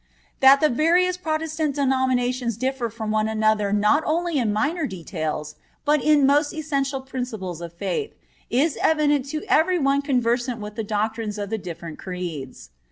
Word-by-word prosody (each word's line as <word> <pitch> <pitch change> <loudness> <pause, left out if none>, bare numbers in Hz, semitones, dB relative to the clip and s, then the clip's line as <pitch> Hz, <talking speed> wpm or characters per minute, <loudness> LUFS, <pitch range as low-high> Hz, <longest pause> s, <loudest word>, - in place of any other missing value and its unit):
That 270 0 +7
the 305 - +4
various 345 +7 +3
Protestant 315 -3 -2
denominations 255 -4 0
differ 255 -1 -1
from 220 -1 -4
one 215 0 +1
another 215 -2 +1
not 210 +9 +3
only 335 -1 0
in 225 -4 +1
minor 295 +9 0
details, 155 -5 -4 0.3
but 300 0 +3
in 300 -2 +5
most 290 +2 +2
essential 275 -3 -1
principles 230 -10 -5
of 170 -1 -6
faith, 315 - -3 0.3
is 285 +5 +1
evident 295 -3 +2
to 305 +2 -4
every 355 +4 +3
one 280 -2 +2
conversant 245 -3 0
with 210 0 -7
the 225 +1 -4
doctrines 215 0 -2
of 205 0 -5
the 220 - -1
different 170 -3 -8
Creeds. 160 - -6
255 Hz, 160 wpm, -23 LUFS, 210-295 Hz, 0.3 s, That